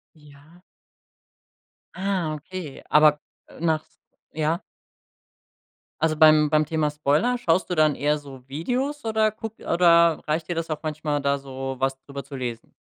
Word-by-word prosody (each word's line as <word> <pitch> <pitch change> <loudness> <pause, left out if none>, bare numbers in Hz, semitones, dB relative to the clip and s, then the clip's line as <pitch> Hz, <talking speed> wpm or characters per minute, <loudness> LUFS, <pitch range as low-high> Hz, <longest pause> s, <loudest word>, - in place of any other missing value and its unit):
Ja. 150 +3 -19 1.3
Ah, 185 -5 -1
okay, 155 -1 -8
aber, 150 -1 +5 0.3
äh, - - -16
nachts 160 -2 -1 0.3
ja. 160 +3 -1 1.4
Also 160 -1 +1
beim 155 -1 +6
beim 155 0 +3
Thema 155 -1 0
Spoiler, 150 - +1
schaust 175 -3 +1
du - - +1
dann 155 -2 +3
eher 150 +1 +1
so 135 -3 -13
Videos 250 - -2
oder 220 -1 +2
guck 220 0 -8
oder 170 -1 +4
reicht 155 +1 0
dir 175 - -1
das 165 0 -4
auch 155 - -2
manchmal, 150 -1 -2
da 140 0 +1
so 135 -1 -6
was 135 0 0
drüber 140 -1 -7
zu 140 +1 -9
lesen? 120 -3 -6
155 Hz, 150 wpm, -24 LUFS, 145-170 Hz, 1.4 s, beim